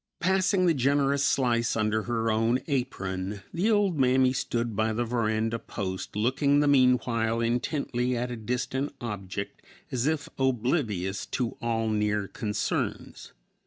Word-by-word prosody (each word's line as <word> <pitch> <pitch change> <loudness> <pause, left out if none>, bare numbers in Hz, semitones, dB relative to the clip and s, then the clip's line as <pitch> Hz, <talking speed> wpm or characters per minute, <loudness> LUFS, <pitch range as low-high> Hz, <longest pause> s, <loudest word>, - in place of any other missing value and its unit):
Passing 190 +1 +2
the 170 - +4
generous 140 +1 +2
slice 120 -4 +2
under 110 0 +1
her 115 0 -1
own 115 +3 +2
apron, 100 - -3
the 185 +6 +1
old 205 -7 +2
mammy 130 0 +4
stood 120 -3 -2
by 110 +1 +1
the 120 +2 -1
veranda 115 -1 0
post, 95 -3 -5
looking 130 +6 +2
the 145 - +3
meanwhile 125 -4 +3
intently 125 +1 -1
at 125 +1 -2
a - - -3
distant 125 +5 -3
object 100 -3 -5 0.3
as 130 +1 0
if 155 -2 0
oblivious 120 - 0
to 125 -3 -2
all 115 -1 0
near 105 -1 0
concerns. 105 0 -3
120 Hz, 135 wpm, -27 LUFS, 110-135 Hz, 0.3 s, the